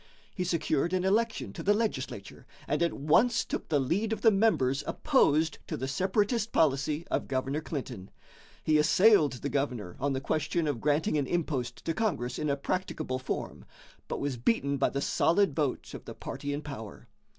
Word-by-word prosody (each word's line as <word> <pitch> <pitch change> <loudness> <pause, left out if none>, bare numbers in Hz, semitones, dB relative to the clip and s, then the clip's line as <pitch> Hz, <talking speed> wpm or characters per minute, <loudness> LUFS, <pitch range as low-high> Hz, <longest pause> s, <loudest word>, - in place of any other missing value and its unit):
He 180 - -2
secured 170 -1 0
an 185 -1 +1
election 220 +4 0
to - - -6
the 205 +1 +3
legislature, 225 0 -4 0.2
and - - 0
at 170 - +2
once 230 - +3
took - - -4
the 150 -3 +3
lead 190 - 0
of 220 - -2
the 225 - +6
members 155 - +2
opposed 160 - +2
to - - -3
the 130 - -3
separatist 205 - 0
policy 150 +2 +1
of - - 0
Governor 135 +3 -1
Clinton. 125 - -6 0.5
He 155 -1 +3
assailed 155 - +5
the 135 +3 -4
governor 125 -11 -2
on 140 +1 0
the 130 - -1
question 155 +4 -1
of 135 -6 -2
granting 150 +1 +1
an 140 - -1
impost 145 -8 -2
to 165 - 0
Congress 155 - -1
in 150 - -1
a 140 - +1
practicable 155 -5 -2
form, 130 - -4 0.4
but - - -3
was 140 -3 -2
beaten 140 - +1
by - - +2
the 140 - -3
solid 175 0 +2
vote 150 -4 -2
of - - -9
the - - -8
party 140 +1 -5
in 145 +1 -3
power. 110 -8 -8
150 Hz, 185 wpm, -29 LUFS, 135-185 Hz, 0.5 s, the